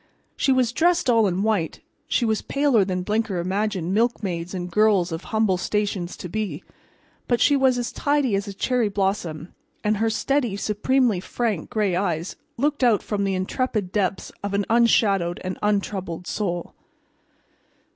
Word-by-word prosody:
She 270 Hz, -, +1 dB
was 255 Hz, -3 st, +3 dB
dressed 340 Hz, -1 st, +2 dB
all 225 Hz, -3 st, +4 dB
in 185 Hz, +1 st, -1 dB
white, 205 Hz, -8 st, 0 dB, 0.3 s
she 240 Hz, -, +1 dB
was 220 Hz, -1 st, +1 dB
paler 275 Hz, -7 st, +2 dB
than 185 Hz, -1 st, -2 dB
Blinker 215 Hz, -1 st, -1 dB
imagined 190 Hz, 0 st, -1 dB
milkmaids 195 Hz, -6 st, 0 dB
and 180 Hz, -2 st, -5 dB
girls 200 Hz, -3 st, +3 dB
of 165 Hz, -, -5 dB
humble 220 Hz, -4 st, +1 dB
stations 195 Hz, -2 st, -2 dB
to -, -, -6 dB
be, 215 Hz, +3 st, -4 dB, 0.6 s
but 240 Hz, -1 st, +2 dB
she 285 Hz, -, +4 dB
was 265 Hz, -2 st, +3 dB
as 240 Hz, -1 st, -2 dB
tidy 285 Hz, -5 st, +1 dB
as 195 Hz, +1 st, 0 dB
a 200 Hz, -, -5 dB
cherry 245 Hz, 0 st, +1 dB
blossom, 190 Hz, -5 st, -2 dB, 0.3 s
and 210 Hz, 0 st, +1 dB
her 225 Hz, +2 st, +1 dB
steady, 245 Hz, -1 st, 0 dB
supremely 220 Hz, +1 st, +1 dB
frank 210 Hz, -2 st, -2 dB
gray 210 Hz, -6 st, 0 dB
eyes 175 Hz, -2 st, -1 dB, 0.2 s
looked 290 Hz, +2 st, 0 dB
out 230 Hz, -5 st, +4 dB
from 200 Hz, -2 st, -1 dB
the 195 Hz, -1 st, 0 dB
intrepid 200 Hz, 0 st, -2 dB
depths 195 Hz, -2 st, -1 dB
of 200 Hz, 0 st, -2 dB
an 200 Hz, 0 st, +1 dB
unshadowed 200 Hz, -7 st, +3 dB
and 185 Hz, 0 st, -4 dB
untroubled 195 Hz, -4 st, -1 dB
soul. 175 Hz, -4 st, -3 dB
205 Hz, 160 wpm, -23 LUFS, 185-235 Hz, 0.6 s, all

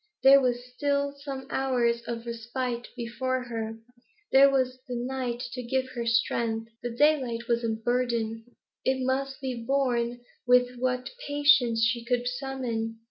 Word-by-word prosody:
There 275 Hz, +1 st, +8 dB
were 250 Hz, -2 st, +2 dB
still 280 Hz, +3 st, -1 dB
some 275 Hz, -2 st, -7 dB
hours 245 Hz, -3 st, +1 dB
of 235 Hz, 0 st, -4 dB
respite 235 Hz, +1 st, -4 dB
before 255 Hz, +2 st, -2 dB
her; 225 Hz, -2 st, -4 dB, 0.5 s
there 275 Hz, +1 st, +8 dB
was 260 Hz, -2 st, 0 dB
the 250 Hz, -, -4 dB
night 245 Hz, 0 st, -3 dB
to 250 Hz, 0 st, -4 dB
give 260 Hz, +2 st, -1 dB
her 240 Hz, -2 st, -4 dB
strength. 230 Hz, 0 st, 0 dB
The 240 Hz, -, -3 dB
daylight 240 Hz, -3 st, +2 dB
was 235 Hz, 0 st, +1 dB
a 230 Hz, -, 0 dB
burden; 225 Hz, -1 st, -1 dB, 0.4 s
it 260 Hz, -1 st, +1 dB
must 270 Hz, +1 st, -1 dB
be 255 Hz, -3 st, -4 dB
borne 245 Hz, -2 st, 0 dB, 0.3 s
with 250 Hz, 0 st, +4 dB
what 250 Hz, 0 st, -1 dB, 0.2 s
patience 285 Hz, -6 st, +4 dB
she 235 Hz, -1 st, -1 dB
could 245 Hz, 0 st, 0 dB
summon. 245 Hz, -3 st, -3 dB
245 Hz, 145 wpm, -28 LUFS, 235-265 Hz, 0.5 s, There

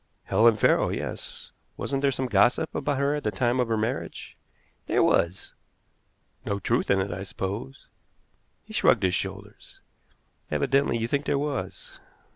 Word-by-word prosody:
"Helen 110 Hz, +3 st, +4 dB
Farrow -, -, +3 dB
yes. -, -, -5 dB, 0.3 s
Wasn't 135 Hz, -1 st, -2 dB
there 140 Hz, -, +3 dB
some 130 Hz, 0 st, -2 dB
gossip 120 Hz, +7 st, +2 dB
about 145 Hz, 0 st, -1 dB
her 140 Hz, +1 st, +1 dB
at 150 Hz, -, -3 dB
the 105 Hz, -, +1 dB
time 120 Hz, +5 st, 0 dB
of 125 Hz, -, +2 dB
her 115 Hz, -1 st, 0 dB
marriage?" 110 Hz, +1 st, -4 dB, 0.5 s
"There -, -, +3 dB
was." 90 Hz, +2 st, +1 dB, 0.9 s
"No 100 Hz, -, -2 dB
truth -, -, 0 dB
in 100 Hz, -, +4 dB
it, 95 Hz, +1 st, -2 dB
I 90 Hz, +2 st, -5 dB
suppose?" 95 Hz, -8 st, -5 dB, 0.8 s
He -, -, -13 dB
shrugged -, -, +3 dB
his 90 Hz, -1 st, +2 dB
shoulders. -, -, -6 dB, 0.7 s
"Evidently 120 Hz, -, +1 dB
you 115 Hz, 0 st, -1 dB
think 140 Hz, +3 st, -1 dB
there -, -, +2 dB
was." 145 Hz, -1 st, -4 dB
115 Hz, 155 wpm, -26 LUFS, 95-140 Hz, 0.9 s, Helen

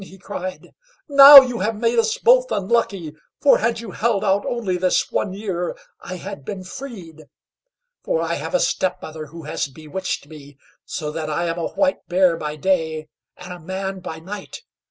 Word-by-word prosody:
he 190 Hz, 0 st, -14 dB
cried; 185 Hz, -1 st, -7 dB, 0.4 s
"now 280 Hz, -1 st, +11 dB
you 250 Hz, -3 st, -4 dB
have 220 Hz, +4 st, -1 dB
made 235 Hz, 0 st, +2 dB
us 445 Hz, -, +1 dB
both -, -, +4 dB
unlucky, 195 Hz, -6 st, -1 dB, 0.3 s
for 285 Hz, -, +5 dB
had 230 Hz, 0 st, 0 dB
you 225 Hz, -4 st, -8 dB
held 215 Hz, -2 st, 0 dB
out 195 Hz, +1 st, +2 dB
only 220 Hz, -7 st, -2 dB
this 180 Hz, 0 st, 0 dB
one 200 Hz, -, -1 dB
year, 190 Hz, -3 st, -4 dB, 0.2 s
I 185 Hz, -, -7 dB
had 190 Hz, -4 st, -8 dB
been 190 Hz, +5 st, -6 dB
freed. 185 Hz, -, -10 dB, 0.8 s
For -, -, 0 dB
I -, -, -1 dB
have -, -, -4 dB
a -, -, +3 dB
step 185 Hz, -, 0 dB
mother 155 Hz, -1 st, -8 dB
who 165 Hz, +3 st, -11 dB
has 150 Hz, -1 st, -3 dB
bewitched 160 Hz, +5 st, -5 dB
me, 145 Hz, -2 st, -14 dB, 0.3 s
so 150 Hz, -3 st, -4 dB
that 155 Hz, 0 st, -4 dB
I 170 Hz, +3 st, -1 dB
am 170 Hz, 0 st, -2 dB
a 165 Hz, -, -1 dB
White 285 Hz, -1 st, -1 dB
Bear 180 Hz, -1 st, +3 dB
by 150 Hz, -2 st, -5 dB
day, 160 Hz, -2 st, -1 dB, 0.3 s
and 180 Hz, -, -9 dB
a 180 Hz, -, -10 dB
Man 190 Hz, +3 st, -5 dB
by 160 Hz, -3 st, -7 dB
night. 190 Hz, +5 st, -9 dB
185 Hz, 185 wpm, -21 LUFS, 160-225 Hz, 0.8 s, now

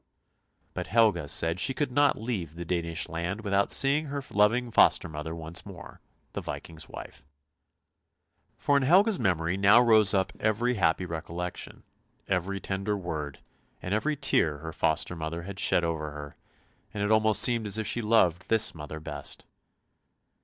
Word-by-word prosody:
" -, -, -44 dB
But -, -, -5 dB
Helga 110 Hz, -8 st, +2 dB
said 85 Hz, +4 st, +1 dB
she 135 Hz, +6 st, +1 dB
could 145 Hz, -2 st, -2 dB
not 145 Hz, +3 st, +2 dB
leave 100 Hz, -9 st, -4 dB
the 85 Hz, 0 st, -7 dB
Danish 85 Hz, -1 st, -2 dB
land 90 Hz, +6 st, -4 dB
without 100 Hz, -1 st, 0 dB
seeing 145 Hz, +3 st, +3 dB
her 140 Hz, 0 st, -5 dB
loving 115 Hz, +4 st, +2 dB
foster -, -, +4 dB
mother 80 Hz, +1 st, -6 dB
once 80 Hz, +1 st, -2 dB
more, 95 Hz, -3 st, -12 dB, 0.3 s
the -, -, -4 dB
Viking's 80 Hz, -1 st, -8 dB
wife. -, -, -10 dB, 1.3 s
For 145 Hz, -, +2 dB
in -, -, +1 dB
Helga's 185 Hz, -, +4 dB
memory 90 Hz, -4 st, 0 dB
now 100 Hz, +4 st, +6 dB
rose 110 Hz, -4 st, +5 dB
up 95 Hz, +1 st, 0 dB
every 110 Hz, +3 st, 0 dB
happy 90 Hz, -4 st, +1 dB
recollection, 85 Hz, +1 st, -6 dB, 0.4 s
every 95 Hz, +1 st, -1 dB
tender 100 Hz, +2 st, -3 dB
word, 75 Hz, -6 st, -6 dB, 0.4 s
and 90 Hz, -, -4 dB
every 150 Hz, +8 st, 0 dB
tear 80 Hz, -, +1 dB
her 80 Hz, +2 st, -8 dB
foster 80 Hz, +2 st, 0 dB
mother 85 Hz, +1 st, -5 dB
had 100 Hz, +2 st, -8 dB
shed 85 Hz, -, +2 dB
over 80 Hz, -2 st, -2 dB
her, 75 Hz, 0 st, -9 dB, 0.6 s
and 100 Hz, -, -2 dB
it 105 Hz, -, 0 dB
almost 110 Hz, -1 st, +4 dB
seemed 115 Hz, -3 st, +3 dB
as 105 Hz, -, 0 dB
if 110 Hz, -, -3 dB
she 120 Hz, -, -1 dB
loved 105 Hz, -6 st, +2 dB
this 110 Hz, -1 st, +2 dB
mother 80 Hz, -1 st, -8 dB
best. 75 Hz, -2 st, -8 dB
95 Hz, 165 wpm, -27 LUFS, 80-110 Hz, 1.3 s, now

